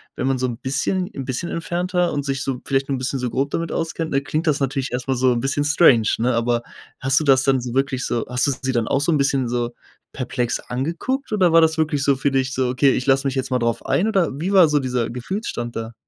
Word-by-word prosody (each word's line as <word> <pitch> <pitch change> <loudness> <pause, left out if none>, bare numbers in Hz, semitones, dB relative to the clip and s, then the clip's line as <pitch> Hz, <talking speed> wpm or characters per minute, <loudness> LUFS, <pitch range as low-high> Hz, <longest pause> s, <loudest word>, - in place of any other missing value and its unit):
wenn 130 - -2
man 135 -1 +1
so 130 - -1
'n 120 -2 -5
bisschen 145 +8 -1
'n 135 - -5
bisschen 130 +6 -3
entfernter 175 +2 -1
und 145 -1 -2
sich 135 -1 -2
so 130 -2 -3
vielleicht 135 0 0
'n 135 - 0
bisschen 130 +2 -2
so 125 -1 -2
grob 135 +2 0
damit 165 0 -2
auskennt, 165 0 -3
ne? 135 - +1
Klingt 155 +4 -2
das 150 -3 +2
natürlich 135 0 -2
erst 125 +1 -4
mal 135 - +1
so 130 +1 +3
'n 120 - -1
bisschen 135 +3 0
strange, 145 -8 +4
ne? 120 +2 +1
Aber 115 0 +1 0.4
hast 135 +1 +2
du - - -2
das 135 -3 +5
dann 135 -1 +3
so 120 -1 -5
wirklich 135 -1 0
so 120 -1 -1
hast 125 0 +1
du - - +2
sie 130 0 -1
dann 120 -3 0
auch 135 - +1
so 155 - +2
'n 155 - +3
bisschen 135 -3 +1
so 120 0 -1 0.4
perplex 125 -2 -2
angeguckt 170 - -3
oder 185 -5 +3
war 165 - +7
das 160 0 +2
wirklich 150 -3 0
so 140 -1 +3
für 135 +2 0
dich 135 0 0
so: 130 -1 0
„Okay, 135 +2 +3
ich 125 - -1
lass 135 0 +3
mich 135 -1 -1
jetzt 130 0 -2
mal 125 - +2
drauf 115 -1 -1
ein“ 200 - +1
oder 195 -6 +2
wie 180 +5 -2
war 185 -4 +7
so 150 - +2
dieser 125 -3 -1
Gefühlsstand 120 - -4
da? 115 +1 -5
135 Hz, 265 wpm, -21 LUFS, 125-155 Hz, 0.4 s, war